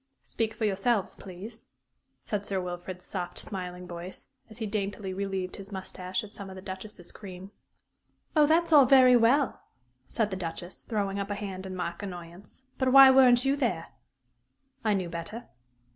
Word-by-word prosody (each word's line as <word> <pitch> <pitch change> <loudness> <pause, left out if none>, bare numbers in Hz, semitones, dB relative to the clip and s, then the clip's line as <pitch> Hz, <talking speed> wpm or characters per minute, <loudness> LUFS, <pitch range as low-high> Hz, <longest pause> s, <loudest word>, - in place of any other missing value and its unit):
"Speak 225 -1 -2
for 220 0 -1
yourselves, 205 +1 +1
please," 205 +5 -9 0.6
said 205 -2 -2
Sir 195 -2 -2
Wilfrid's 180 0 -6
soft, 180 -3 -5
smiling 180 -2 -5
voice, 175 +1 -8 0.2
as 220 - -11
he 225 - -3
daintily 200 -2 -3
relieved 190 -1 -3
his 195 0 -9
mustache 185 -1 -4
of 210 - -10
some 200 -2 -7
of 190 - -9
the 185 - -8
Duchess's 190 -1 -8
cream. 190 -1 -10 0.8
"Oh, 300 -1 +6
that's 330 +2 +3
all 280 -4 +8
very 255 -2 +7
well," 245 +4 +3 0.5
said 215 -3 -1
the - - -2
Duchess, 175 0 -6
throwing 200 -3 -1
up 200 +1 -3
a 205 - -1
hand 195 -2 -5
in 185 - -6
mock 170 0 -4
annoyance; 180 +4 -9 0.2
"but 260 -1 +2
why 270 0 +10
weren't 255 -1 +6
you 270 +1 +3
there?" 285 - -1 0.9
"I 215 -2 +2
knew 185 -2 -1
better." 170 +8 -6
200 Hz, 170 wpm, -28 LUFS, 185-230 Hz, 0.9 s, why